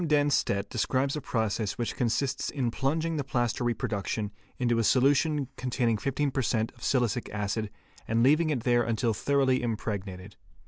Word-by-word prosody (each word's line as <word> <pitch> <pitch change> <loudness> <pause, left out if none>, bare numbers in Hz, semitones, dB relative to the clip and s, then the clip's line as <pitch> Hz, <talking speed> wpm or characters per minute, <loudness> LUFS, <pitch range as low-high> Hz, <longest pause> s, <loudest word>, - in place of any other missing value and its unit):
Dennstedt®® 145 -10 +2
describes 130 +5 0
a 150 - -3
process 110 -4 -1
which 120 - -2
consists 130 +3 0
in 125 -5 -1
plunging 160 +6 -1
the 145 - -1
plaster 120 -3 -1
reproduction 105 -3 -2 0.3
into 120 -2 +1
a - - +2
solution 140 +4 +3
containing 120 -3 0
15 140 +3 -1
per 135 - 0
cent. 110 -2 0
of 120 - -23
silicic 120 -3 0
acid 105 +1 -2 0.4
and 115 +1 +2
leaving 155 +5 +4
it 140 -6 0
there 120 -1 +3
until 115 -1 0
thoroughly 135 +2 +2
impregnated. 105 -4 -4
120 Hz, 155 wpm, -28 LUFS, 110-140 Hz, 0.4 s, leaving